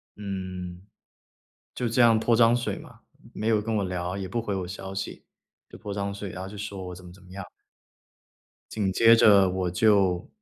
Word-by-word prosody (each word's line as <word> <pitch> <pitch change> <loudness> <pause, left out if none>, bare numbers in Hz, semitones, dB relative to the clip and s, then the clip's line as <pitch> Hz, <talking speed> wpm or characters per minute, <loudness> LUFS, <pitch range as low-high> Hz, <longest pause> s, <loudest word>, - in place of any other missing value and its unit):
嗯， 95 -3 -6 0.9
就 125 - -2
这 120 +2 +2
样 115 -2 +5
泼 115 +1 +2
脏 115 +1 +5
水 120 - -2
嘛。 - - -13 0.3
没 110 - -4
有 110 -2 +3
跟 110 +1 -3
我 100 - 0
聊， 90 0 -3
也 95 -1 -4
不 115 +6 -2
回 105 -3 -3
我 95 -2 -3
消 95 +1 -7
息， 95 - -6 0.5
就 - - -12
泼 100 - -6
脏 100 0 -3
水， 100 -1 -6
然 90 +1 -7
后 95 - -7
就 105 - -10
说 100 -3 -6
我 90 - -7
怎 90 +1 -13
么 90 - -11
怎 95 0 -18
么 90 - -18
样。 95 -1 -8 1.2
紧 100 -3 -1
接 115 +4 +6
着 100 -4 +6
我 90 -1 -1
就 95 -3 +2
100 Hz, 220 characters per minute, -26 LUFS, 95-110 Hz, 1.2 s, 接